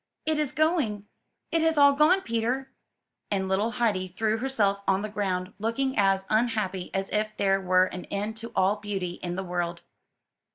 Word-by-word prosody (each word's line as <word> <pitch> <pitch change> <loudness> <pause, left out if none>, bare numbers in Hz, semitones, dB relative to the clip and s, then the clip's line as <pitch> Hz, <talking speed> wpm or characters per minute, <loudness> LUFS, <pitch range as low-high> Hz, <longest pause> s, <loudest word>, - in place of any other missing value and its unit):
It 310 -1 +1
is 295 -3 0
going! 295 - +1 0.5
it 330 - +2
has 320 -1 +2
all 285 -1 +7
gone, 310 +7 +4
Peter 245 +1 -2
!^' - - -44 0.5
and 190 -2 -1
little 195 +4 +1
Heidi 215 -7 0
threw 215 +4 -1
herself 215 -6 +1
on 195 +1 +2
the 215 - -3
ground, 185 -3 -2
looking 260 +5 -1
as 195 -1 +2
unhappy 215 -5 0
as 195 0 -2
if 215 0 -1
there 195 -1 +2
were 185 0 +4
an 180 -1 -7
end 205 +2 -3
to 230 +1 -7
all 195 +3 +3
beauty 195 -4 -4
in 175 0 -3
the 190 - -3
world. 175 -1 -3
210 Hz, 180 wpm, -27 LUFS, 190-245 Hz, 0.5 s, all